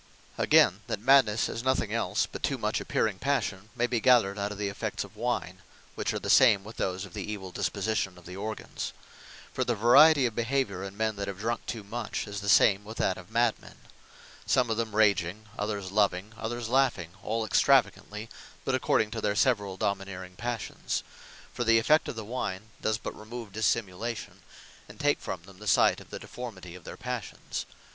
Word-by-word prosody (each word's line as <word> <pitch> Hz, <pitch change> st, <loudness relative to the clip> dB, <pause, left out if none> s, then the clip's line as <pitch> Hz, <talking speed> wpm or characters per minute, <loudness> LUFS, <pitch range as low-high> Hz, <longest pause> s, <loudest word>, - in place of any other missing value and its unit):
Again, -, -, +4 dB
that -, -, -2 dB
Madnesse 115 Hz, -2 st, +4 dB
is 115 Hz, -, -5 dB
nothing 130 Hz, -5 st, +1 dB
else, 115 Hz, -, +1 dB
but -, -, -9 dB
too -, -, 0 dB
much -, -, -1 dB
appearing 100 Hz, -4 st, 0 dB
Passion, 110 Hz, -7 st, -1 dB
may 120 Hz, -, +2 dB
be 120 Hz, -1 st, 0 dB
gathered 110 Hz, -5 st, +4 dB
out 100 Hz, +1 st, -1 dB
of 105 Hz, -, -6 dB
the 105 Hz, 0 st, -1 dB
effects 100 Hz, -, -3 dB
of -, -, -14 dB
Wine, -, -, -2 dB, 0.3 s
which -, -, -2 dB
are -, -, -2 dB
the -, -, -6 dB
same 100 Hz, -2 st, +6 dB
with 110 Hz, +3 st, -11 dB
those 95 Hz, +1 st, -2 dB
of 95 Hz, -, -14 dB
the 105 Hz, -, -4 dB
evill 95 Hz, -3 st, -6 dB
disposition 95 Hz, 0 st, -1 dB
of 90 Hz, -, -16 dB
the 90 Hz, -, -8 dB
organs. 110 Hz, +3 st, -5 dB, 0.6 s
For 130 Hz, -, 0 dB
the 120 Hz, -1 st, 0 dB
variety 135 Hz, +6 st, +7 dB
of 120 Hz, -, 0 dB
behaviour 115 Hz, -5 st, -1 dB
in 100 Hz, +1 st, -7 dB
men 110 Hz, -1 st, 0 dB
that 100 Hz, -, -3 dB
have 100 Hz, -, -5 dB
drunk 115 Hz, +3 st, -3 dB
too 110 Hz, -3 st, -4 dB
much, 110 Hz, +2 st, -4 dB
is 100 Hz, -1 st, -5 dB
the 100 Hz, -, -2 dB
same 100 Hz, 0 st, +5 dB
with 110 Hz, +2 st, -9 dB
that 95 Hz, -, +1 dB
of 90 Hz, +1 st, -13 dB
Mad 115 Hz, 0 st, +2 dB
men: -, -, -14 dB, 0.7 s
some 125 Hz, -3 st, +3 dB
of 110 Hz, -, 0 dB
them 115 Hz, -2 st, -2 dB
Raging, 100 Hz, -1 st, +2 dB
others 105 Hz, -2 st, -3 dB
Loving, 100 Hz, 0 st, +1 dB
others 115 Hz, +1 st, -4 dB
laughing, 120 Hz, -10 st, +1 dB
all 110 Hz, +1 st, -1 dB
extravagantly, 105 Hz, +1 st, +2 dB, 0.4 s
but 135 Hz, -, 0 dB
according 110 Hz, -4 st, +2 dB
to 115 Hz, -, -4 dB
their 105 Hz, -1 st, 0 dB
severall 105 Hz, -6 st, +1 dB
domineering 95 Hz, -2 st, -3 dB
Passions: 120 Hz, +2 st, -3 dB, 0.5 s
For 120 Hz, -, -2 dB
the 115 Hz, -1 st, +5 dB
effect 155 Hz, +8 st, +4 dB
of -, -, -4 dB
the 110 Hz, -1 st, -6 dB
wine, 110 Hz, -3 st, -4 dB
does 110 Hz, 0 st, +1 dB
but -, -, -6 dB
remove 115 Hz, 0 st, -8 dB
Dissimulation; 110 Hz, +1 st, -2 dB, 0.5 s
and 105 Hz, -, -13 dB
take 145 Hz, 0 st, +2 dB
from 90 Hz, -3 st, -5 dB
them 95 Hz, 0 st, -15 dB
the 105 Hz, -, -9 dB
sight -, -, +4 dB
of -, -, -15 dB
the -, -, -6 dB
deformity 100 Hz, -8 st, -8 dB
of 90 Hz, -2 st, -12 dB
their -, -, -8 dB
Passions. 125 Hz, -5 st, -5 dB
110 Hz, 200 wpm, -28 LUFS, 100-120 Hz, 0.7 s, variety